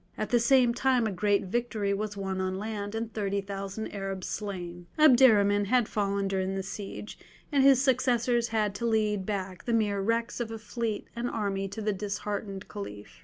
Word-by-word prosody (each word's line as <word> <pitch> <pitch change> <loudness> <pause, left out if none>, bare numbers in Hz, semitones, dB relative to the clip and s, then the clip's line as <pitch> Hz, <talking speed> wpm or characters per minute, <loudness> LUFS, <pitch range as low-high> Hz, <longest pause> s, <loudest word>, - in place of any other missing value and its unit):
At 215 - -3
the 240 - +5
same 245 0 +4
time 250 -1 +2
a 215 - 0
great 200 +1 +1
victory 215 -1 -1
was 205 0 -3
won 190 -1 -2
on 185 0 -1
land 205 0 -4
and 225 0 -4
thirty 200 -2 -1
thousand 195 +2 -5
Arabs 195 -2 -4
slain. 175 -4 -5
Abderrahman 225 -9 +6
had 245 0 +3
fallen 200 -1 0
during 190 0 -1
the 195 - -2
siege, 200 +2 -7 0.3
and 280 -2 +4
his 270 -1 +6
successors 245 -2 +2
had 215 -3 0
to 235 +3 -2
lead 210 -3 +1
back 190 -3 -4
the 235 - 0
mere 205 -3 +1
wrecks 230 +4 -1
of 235 -2 -2
a 225 - -5
fleet 220 0 -3
and 240 +1 -2
army 195 -3 -2
to 210 +3 -6
the 210 0 +1
disheartened 200 0 -4
Caliph. 105 - -8
210 Hz, 185 wpm, -29 LUFS, 195-230 Hz, 0.3 s, Abderrahman